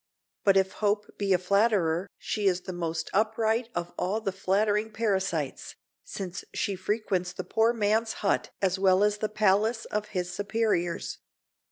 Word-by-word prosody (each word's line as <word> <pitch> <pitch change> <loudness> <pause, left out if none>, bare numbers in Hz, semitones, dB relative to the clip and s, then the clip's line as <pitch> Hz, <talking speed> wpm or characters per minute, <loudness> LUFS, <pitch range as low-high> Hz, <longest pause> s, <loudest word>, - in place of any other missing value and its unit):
But 195 -1 +5
if 190 0 +3
hope 205 0 -1
be 200 -1 0
a 185 - +6
flatterer 190 -2 +2
she 210 -2 -1
is 180 -1 +2
the 185 - -6
most 165 -2 -3
upright 220 +2 +1
of 175 0 -3
all 200 +4 0
the 200 -3 -2
flattering 205 +3 +1
parasites, 190 -10 -1 0.3
since 185 -2 -6
she 200 - -1
frequents 185 -2 -1
the 185 - -5
poor 225 +4 +2
man's 220 0 +1
hut - - +1
as 190 0 +2
well 190 0 +4
as 210 0 +2
the 215 - -1
palace 215 +2 +2
of 210 0 -3
his 180 -4 -3
superiors. 205 -4 -1
200 Hz, 160 wpm, -28 LUFS, 185-215 Hz, 0.3 s, a